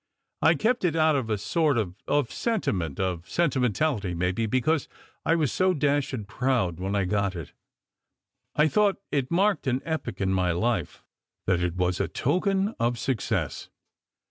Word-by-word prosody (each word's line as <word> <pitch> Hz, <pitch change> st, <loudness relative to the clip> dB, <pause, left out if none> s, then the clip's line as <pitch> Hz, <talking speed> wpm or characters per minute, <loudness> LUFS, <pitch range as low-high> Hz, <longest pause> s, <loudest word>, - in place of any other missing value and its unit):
I -, -, +5 dB
kept 240 Hz, +1 st, +1 dB
it, 170 Hz, -3 st, +1 dB
out 155 Hz, -1 st, +4 dB
of 130 Hz, -5 st, -1 dB
a 105 Hz, -, +1 dB
sort 150 Hz, -, +1 dB
of 100 Hz, -6 st, -1 dB
of 145 Hz, -5 st, +1 dB
sentiment, 95 Hz, -, -1 dB
or 90 Hz, -3 st, -1 dB
sentimentality 125 Hz, -, 0 dB
maybe, 90 Hz, +6 st, 0 dB
because 130 Hz, +6 st, +1 dB, 0.4 s
I 165 Hz, -, +4 dB
was 155 Hz, -6 st, +1 dB
so 185 Hz, 0 st, +2 dB
dashed 145 Hz, -2 st, +1 dB
proud 120 Hz, -11 st, 0 dB
when 95 Hz, +2 st, -2 dB
I 100 Hz, -2 st, +1 dB
got 100 Hz, 0 st, 0 dB
it. 85 Hz, -4 st, -7 dB, 1.0 s
I 150 Hz, +1 st, +4 dB
thought 200 Hz, +6 st, +2 dB
it 135 Hz, -3 st, 0 dB
marked 195 Hz, -2 st, +2 dB
an 130 Hz, 0 st, +1 dB
epoch 160 Hz, -8 st, -3 dB
in 95 Hz, -1 st, +1 dB
my 90 Hz, -2 st, +1 dB
life; 100 Hz, -1 st, -1 dB, 0.4 s
that 90 Hz, -2 st, +2 dB
it 90 Hz, -1 st, -1 dB
was 90 Hz, 0 st, 0 dB
a -, -, +1 dB
token 190 Hz, -, +1 dB
of 120 Hz, +1 st, +1 dB
success. 120 Hz, -2 st, -2 dB
125 Hz, 165 wpm, -26 LUFS, 95-160 Hz, 1.0 s, I